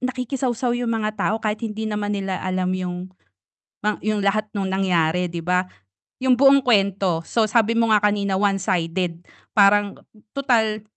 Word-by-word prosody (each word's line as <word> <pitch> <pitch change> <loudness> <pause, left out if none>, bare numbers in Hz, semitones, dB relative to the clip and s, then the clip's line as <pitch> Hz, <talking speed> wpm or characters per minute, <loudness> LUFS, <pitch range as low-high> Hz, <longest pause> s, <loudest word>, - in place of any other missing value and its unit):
nakikisawsaw 255 -1 -2
yung 240 -1 -2
mga 215 -1 -1 0.2
tao 220 - 0
kahit 215 0 -2
hindi 220 -1 -4
naman 210 -1 -2
nila 195 -2 -3
alam 185 0 -2
yung 180 0 -4 0.7
mang 210 0 0
yung 215 -1 0
lahat 205 +2 +1
nung 195 -2 -2
nangyari 180 -2 +1
'di 170 - -4
ba, 180 +2 +1 0.6
yung 260 0 +3
buong 275 +1 +5
kwento. 195 -6 +2
So, 225 +5 +1
sabi 230 +1 +2
mo 230 -1 +2
nga 210 - +4
kanina 205 -1 +1
one 200 0 +1
sided 175 -2 -2 0.3
parang, 205 -1 +4 0.4
"Tutal, 225 -6 +1
205 Hz, 160 wpm, -22 LUFS, 185-225 Hz, 0.7 s, buong